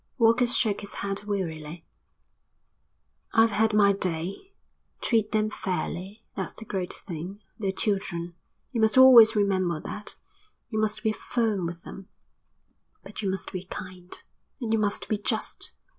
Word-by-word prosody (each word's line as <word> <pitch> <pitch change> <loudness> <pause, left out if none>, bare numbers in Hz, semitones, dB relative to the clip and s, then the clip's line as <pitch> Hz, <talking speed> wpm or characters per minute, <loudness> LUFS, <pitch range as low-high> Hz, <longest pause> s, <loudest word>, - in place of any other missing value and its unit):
Walker 230 +1 +4
shook 225 -4 +4
his 200 - -7
head 200 +1 -3
wearily. 165 -5 -4 1.5
"I've 225 0 +5
had 220 +2 +2
my 205 -1 +5
day. 190 - -3 0.4
Treat 225 -3 +1
them 215 0 +1
fairly, 190 +2 -4
that's - - -4
the 225 - -10
great 185 -4 -3
thing. 180 +3 -7 0.2
They're 195 -3 0
children. 190 -4 -2 0.4
You 235 - -1
must 220 +3 +3
always 240 -4 +9
remember 185 -5 +1
that. 210 - -4 0.5
You 220 - -2
must 215 0 -1
be 220 - +2
firm 215 -5 -1
with 170 0 -8
them, 195 0 -10 1.0
but 210 - -7
you 200 - -1
must 190 0 -3
be 185 -1 -5
kind. 185 -1 -9 0.4
And 230 -4 -2
you 225 - +3
must 205 -1 -1
be 215 - -1
just. 220 +1 -2
205 Hz, 145 wpm, -27 LUFS, 185-220 Hz, 1.5 s, always